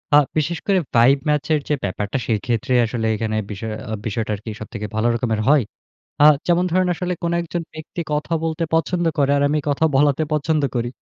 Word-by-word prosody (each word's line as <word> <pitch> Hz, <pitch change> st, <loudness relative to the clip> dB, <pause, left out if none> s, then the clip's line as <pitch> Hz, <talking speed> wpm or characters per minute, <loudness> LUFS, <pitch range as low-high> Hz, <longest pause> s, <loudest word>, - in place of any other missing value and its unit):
আ -, -, +9 dB, 0.2 s
বিশেষ 160 Hz, +3 st, 0 dB
করে 195 Hz, -2 st, +4 dB, 0.2 s
ভাইব 120 Hz, +4 st, +6 dB
ম্যাচের 150 Hz, +1 st, +1 dB
যে 150 Hz, -, +3 dB
ব্যাপারটা 100 Hz, +4 st, -2 dB
সেইক্ষেত্রে 115 Hz, +2 st, -1 dB
আসলে 115 Hz, 0 st, -3 dB
এইখানে 110 Hz, 0 st, -2 dB
বিষয় 110 Hz, +2 st, -5 dB, 0.2 s
আ -, -, -2 dB
বিষয়টা 110 Hz, 0 st, -2 dB
কি 110 Hz, -, -5 dB
সবথেকে 110 Hz, 0 st, -6 dB
ভালো 110 Hz, +2 st, +1 dB
রকমের 115 Hz, -2 st, -1 dB
হয়। 145 Hz, -2 st, +5 dB, 0.6 s
আহ 150 Hz, 0 st, +8 dB
যেমন 175 Hz, +1 st, +3 dB
ধরুন 185 Hz, 0 st, +2 dB
আসলে 180 Hz, +1 st, -3 dB
কোন 170 Hz, 0 st, 0 dB
একজন 170 Hz, 0 st, -4 dB
ব্যক্তি 155 Hz, +2 st, -7 dB
কথা 150 Hz, +3 st, -2 dB
বলতে 165 Hz, 0 st, -1 dB
পছন্দ 175 Hz, +2 st, +1 dB
করে, 140 Hz, -1 st, +3 dB
আর 140 Hz, -, +2 dB
আমি 150 Hz, +1 st, +1 dB
কথা 145 Hz, +3 st, +1 dB
বলাতে 145 Hz, +2 st, +3 dB
পছন্দ 155 Hz, 0 st, +1 dB
করি। 120 Hz, 0 st, -1 dB
145 Hz, 190 wpm, -21 LUFS, 115-160 Hz, 0.6 s, আ